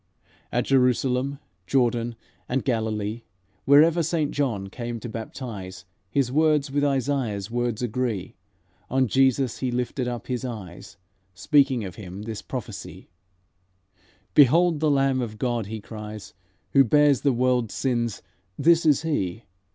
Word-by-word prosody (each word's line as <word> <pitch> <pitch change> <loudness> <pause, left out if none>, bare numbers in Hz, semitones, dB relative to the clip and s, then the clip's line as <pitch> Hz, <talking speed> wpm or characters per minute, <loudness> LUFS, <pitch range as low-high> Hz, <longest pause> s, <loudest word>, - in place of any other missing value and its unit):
"At 120 - 0
Jerusalem, 130 +1 +2 0.3
Jordan 120 -1 +1 0.3
and 130 +2 -1
Galilee, 110 -2 -1 0.4
Wherever 155 +5 +6
Saint 160 -2 0
John 115 -9 -1
came 120 +3 -5
to 120 - -7
baptize, 105 -5 -7 0.2
His 130 +1 0
words 150 -1 +2
with 145 +1 0
Isaiah's 130 -7 -1
words 120 -1 -1
agree. 115 -5 -2 0.5
On 130 0 +2
Jesus 130 0 +2
he 130 - -1
lifted 125 +1 -2
up 120 -1 -4
his 125 -1 -3
eyes, 105 -9 -8 0.4
Speaking 135 - +3
of 95 -3 -7
Him 95 0 -8
this 110 -2 -5
prophecy: - - -7 1.2
'Behold 160 +4 +5
the 155 0 +2
Lamb 135 -2 +2
of 110 -3 -5
God!' 120 -2 -1
he 110 +1 -5
cries: 105 -1 -9 0.4
'Who 140 - +7
bears 145 +1 +4
the 140 - +3
world's 125 -2 +1
sins, 120 -4 -1 0.3
this 165 +2 +4
is 150 0 +4
He! 115 - -2
125 Hz, 135 wpm, -25 LUFS, 110-140 Hz, 1.2 s, Who